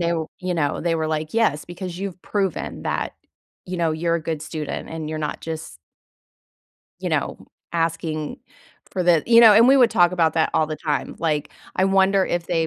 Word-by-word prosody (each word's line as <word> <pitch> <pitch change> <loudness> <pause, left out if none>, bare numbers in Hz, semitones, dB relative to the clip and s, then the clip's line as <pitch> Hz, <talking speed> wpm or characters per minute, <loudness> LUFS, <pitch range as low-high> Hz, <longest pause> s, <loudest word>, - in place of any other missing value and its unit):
w 170 -2 0
you 180 -1 -2
know, 145 -4 0
they 170 0 0
were 160 -1 -1
like, 155 +3 -3
"Yes, 185 -10 +2
because 175 0 -7
you've 190 -2 -5
proven 195 -2 -2
that, - - -2 0.5
you 180 0 -4
know, 165 -1 +1
you're 165 +2 0
a 165 - -6
good 160 -2 -3
student, 155 -2 -5
and 160 -1 -5
you're 155 - -3
not 150 -1 -3
just" 160 - -6 1.2
"you - - -2
know, - - -1 0.3
asking 165 -2 -2 0.5
for 185 - -1
the" 170 -3 +4
you 230 0 +7
know, 225 -2 +9
and 230 +4 +7
we 270 - +7
would 245 -3 +5
talk 175 0 +4
about 165 -3 +2
that 160 - +2
all 155 - +3
the 155 0 -4
time, 150 -2 -2
like, 155 -3 -1 0.3
I 185 - +3
wonder 195 0 +3
if 175 -1 -2
they 165 -2 0
170 Hz, 200 wpm, -22 LUFS, 155-185 Hz, 1.2 s, know